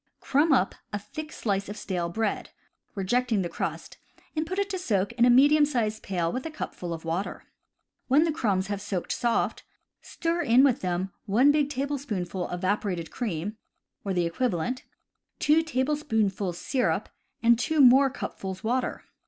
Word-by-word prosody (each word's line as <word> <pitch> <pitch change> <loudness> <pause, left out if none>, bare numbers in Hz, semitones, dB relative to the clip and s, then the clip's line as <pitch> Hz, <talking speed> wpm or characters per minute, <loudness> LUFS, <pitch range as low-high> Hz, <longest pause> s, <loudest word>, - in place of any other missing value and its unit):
Crumb 295 +4 +2
up 220 -8 +3 0.2
a 205 - -1
thick 305 +9 -8
slice 200 -6 -2
of 210 - -6
stale 175 -3 -2
bread, 215 +4 -2 0.5
rejecting 220 +2 +1
the 175 - -3
crust, - - -5 0.4
and 310 +1 -1
put 370 +3 -4
it 400 0 +1
to 375 - -2
soak 205 - 0
in 235 0 +3
a - - +5
medium 290 +5 +6
sized 230 -7 0
pail 175 -3 -1
with 255 - -3
a 325 - -4
cupful 180 - -6
of 165 0 -6
water. 170 +5 -3 0.6
When 280 +4 +5
the 330 - +1
crumbs 205 - 0
have 200 0 -4
soaked 195 -4 -3
soft, 235 -2 0 0.4
stir 335 +1 -2
in 245 -2 +5
with 270 -3 +3
them 185 +1 -2
1 245 +8 +5
big 290 -1 +2
tablespoonful 250 -11 -3
evaporated 185 -1 -2
cream, 210 -2 -3 0.5
or 200 - -2
the 175 -2 +1
equivalent, 240 +5 -1 0.5
2 305 +2 +4
tablespoonfuls 255 - -1
syrup, 255 +5 0 0.4
and 235 0 +5
2 315 +4 0
more 270 +1 +7
cupfuls 190 -8 -6
water. 245 +3 -1
230 Hz, 160 wpm, -27 LUFS, 190-280 Hz, 0.6 s, more